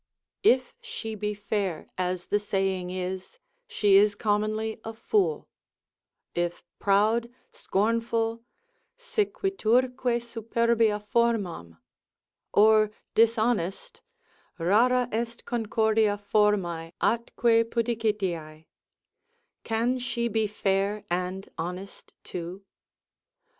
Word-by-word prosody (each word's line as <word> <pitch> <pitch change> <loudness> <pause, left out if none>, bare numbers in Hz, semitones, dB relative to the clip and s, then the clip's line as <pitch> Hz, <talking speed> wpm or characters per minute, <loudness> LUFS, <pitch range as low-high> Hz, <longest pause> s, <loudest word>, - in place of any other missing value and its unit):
If 260 -10 +3
she 460 - -6
be 210 0 -3
fair, 200 -4 -3
as 180 -1 -2
the 205 - +2
saying 195 -3 -1
is, 185 - -5 0.3
she 205 - +4
is 205 +1 +4
commonly 215 +1 -1
a 225 - -6
fool: 425 - 0 0.9
if 175 0 -2 0.2
proud, 215 +4 +2 0.2
scornful, 230 +2 0 0.5
sequiturque 260 - 0
superbia 230 -1 +1
formam, 200 - 0 0.7
or 215 0 +5 0.2
dishonest, 225 - +1 0.6
rara 235 +8 +3
est 230 +1 -3
concordia 220 -2 +1
formae, 200 -5 +1
atque 230 0 +2
pudicitiae, 205 -10 -2 1.0
can 235 +3 0
she 240 -1 -1
be 220 -1 0
fair 200 0 0
and 180 +2 -2
honest 180 +4 -7
too? 180 +3 -6
215 Hz, 85 wpm, -27 LUFS, 195-235 Hz, 1.0 s, or